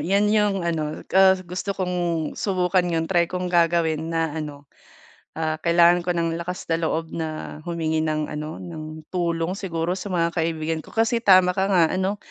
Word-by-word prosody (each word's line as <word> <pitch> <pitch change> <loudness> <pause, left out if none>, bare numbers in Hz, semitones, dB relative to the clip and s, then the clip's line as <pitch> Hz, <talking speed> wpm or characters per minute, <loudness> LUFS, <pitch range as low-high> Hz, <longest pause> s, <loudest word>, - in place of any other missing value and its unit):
'yan 200 +3 +2
yung 205 -3 +2
ano, 155 -3 -2
ah, 190 0 +7
gusto 185 +3 -4
kong 180 -1 -2 0.4
subukan 185 -2 +1
'yon, 165 0 +1
try 170 -2 +3
kong 180 0 -3
gagawin 165 -2 +2
na 165 -1 0
ano, 145 -2 -7 0.7
ah, 155 -1 -2
kailangan 170 +1 +4
ko - - -2
ng 165 -1 0
lakas 180 +2 -5
na 165 - +3
loob 160 0 -2
na 155 -2 -5
humingi 160 -2 -1
ng 155 -1 -1
ano, 150 +1 -5
ng 155 -2 -8
tulong 170 -1 -1
siguro 175 -3 -2
sa 190 +2 -6
mga 170 -1 +1
kaibigan 160 -1 -1
ko. - - -15
Kasi 230 +1 +2
tama 185 -3 +6
ka 190 0 +1
nga 180 -4 +5
ano, 190 +2 -1
170 Hz, 175 wpm, -23 LUFS, 160-185 Hz, 0.7 s, ah